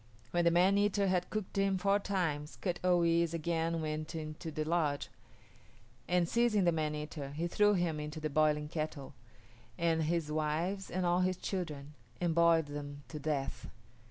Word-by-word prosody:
When 175 0 +1
the - - +7
man 185 +4 +4
eater 205 -1 +2
had 180 -1 0
cooked 215 -3 -4
him 195 -1 +2
four 200 +2 +2
times 165 -7 -2
Kut 175 -3 -2
o 180 -1 +4
yis´ 170 0 +2
again 165 0 -1
went 155 +1 -4
into 155 +1 -5
the 155 0 -2
lodge, 155 -3 0 1.0
and 175 -1 +2
seizing 235 -1 +2
the 175 - +4
man 155 -2 -1
eater, 150 -2 -6
he 160 +3 -2
threw 205 +3 +3
him 170 -4 0
into 150 +1 -5
the 155 - -2
boiling 150 0 +2
kettle, 155 -3 -4 0.6
and 165 -2 +2
his 165 -1 -1
wives 160 +6 -1
and 185 0 -1
all 175 +1 +3
his 185 0 +1
children, 155 -7 -4 0.3
and 175 -2 +1
boiled 170 -1 +4
them 145 -1 -7
to 155 - -6
death. 145 -2 -3
165 Hz, 175 wpm, -33 LUFS, 150-180 Hz, 1.0 s, the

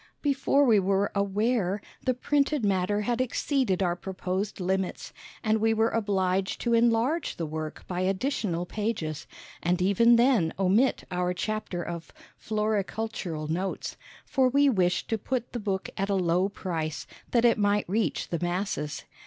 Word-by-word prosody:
Before 280 0 +3
we 225 -5 +5
were 195 +1 +1
aware, 200 0 +1 0.2
the 255 - +1
printed 285 -1 +1
matter 200 +1 +1
had 240 +3 0
exceeded 255 -6 0
our 175 -1 +1
proposed 190 +2 -3
limits, 190 0 -2 0.3
and 220 -1 +2
we 225 +1 +2
were 225 +1 +2
obliged 195 -3 0
to 235 - +1
enlarge 235 +7 +2
the 165 - -3
work 155 0 -6
by 180 0 -2
additional 190 -2 -1
pages, 205 -7 -3 0.3
and 175 +1 +1
even 200 +6 +5
then 235 -9 +3
omit 195 +8 +2
our 180 0 0
chapter 215 -3 -3
of 170 -1 -6 0.2
"Floricultural 210 -6 -2
Notes," 180 +5 -3 0.3
for 260 -1 +2
we 280 +2 +4
wished 180 -5 +1
to 225 - 0
put 250 +2 -3
the 240 - -2
book 195 -3 -2
at 195 +1 -1
a 200 - +2
low 180 +1 +2
price, 165 -6 -4 0.2
that 240 -1 +3
it 235 -1 +4
might 205 0 +2
reach 215 +5 -1
the 170 - -2
masses. 175 -4 -2
200 Hz, 155 wpm, -27 LUFS, 180-230 Hz, 0.3 s, we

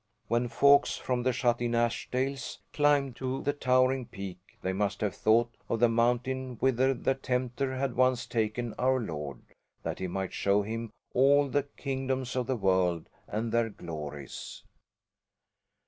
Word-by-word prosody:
When 120 +2 +2
folks 140 +4 +4
from 125 -1 -1
the 130 +1 +2
shut 120 -1 +1
in 120 -1 0
Ashdales 125 +1 -1 0.2
climbed 145 -3 +3
to 130 0 -3
the 145 - +1
towering 130 -2 +2
peak 95 -2 -7 0.2
they 95 - 0
must 100 0 -1
have 105 -2 0
thought 115 +2 +3 0.2
of 115 - 0
the 120 0 +5
mountain 125 +2 0
whither 130 +1 +3
the 135 - +1
Tempter 130 0 -2
had 130 -1 -1
once 130 0 +3
taken 115 +1 -1
Our 130 +1 +3
Lord, 75 - -5 0.4
that - - -3
he 95 - -2
might 95 +1 -3
show 100 +1 +2
Him 115 +2 -4 0.2
all 140 +2 +5
the 145 +1 0
kingdoms 130 -2 -2
of 125 -2 -1
the 130 - +1
world, 95 -4 +1 0.2
and 110 +2 -2
their 115 0 +2
glories. 75 -7 -7
120 Hz, 155 wpm, -29 LUFS, 105-130 Hz, 0.4 s, the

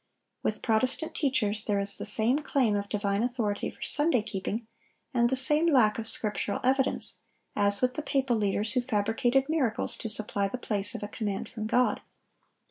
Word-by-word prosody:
With 215 - -3
Protestant 255 +8 +1
teachers 220 -8 -1
there 205 -2 0
is 200 0 +2
the - - -3
same 240 +6 +3
claim 265 -8 0
of 200 0 -4
divine 205 -1 -1
authority 235 -4 -2
for - - -11
Sunday 295 -6 +4
keeping, 215 +1 -4 0.5
and 240 -1 +2
the 265 - 0
same 295 +5 +4
lack 235 -9 +3
of 225 - +1
scriptural 210 -2 0
evidence, 265 +1 +2 0.3
as 200 -1 +2
with 250 0 +1
the 305 - -4
papal 270 -4 -1
leaders 210 +1 -1
who 250 - +1
fabricated 245 +3 0
miracles 280 -8 -1
to 225 - -5
supply 210 -2 -1
the 225 - -5
place 205 -4 0
of - - -6
a - - -4
command 205 -2 -4
from 215 -2 -6
God. 250 +3 +1
225 Hz, 180 wpm, -27 LUFS, 205-260 Hz, 0.5 s, Sunday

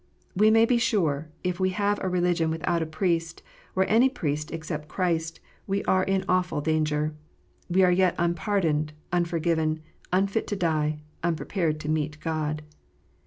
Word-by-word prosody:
We 210 +3 +5
may 225 +1 +6
be 240 0 +2
sure, 160 -10 +1
if 180 0 -1
we 185 0 +2
have 205 0 +1
a 190 - -1
religion 175 -2 +1
without 165 +1 0
a 160 - -1
Priest, 165 0 -1 0.3
or 190 0 +3
any 235 +5 +5
Priest 150 - -3
except 155 -2 -5
Christ, 165 -2 -1 0.3
we 200 +1 0
are 185 - +3
in 195 0 0
awful 180 -3 +1
danger: 155 0 0 0.6
we 185 +2 +4
are 180 - +5
yet 180 0 +3
unpardoned, 170 -3 0 0.2
unforgiven, 165 -2 +1 0.3
unfit 195 +4 +1
to 205 - -2
die, 155 -4 0 0.2
unprepared 165 -1 -1
to 150 - -4
meet 155 -1 -1
God. 155 -2 -2
170 Hz, 155 wpm, -26 LUFS, 155-190 Hz, 0.6 s, may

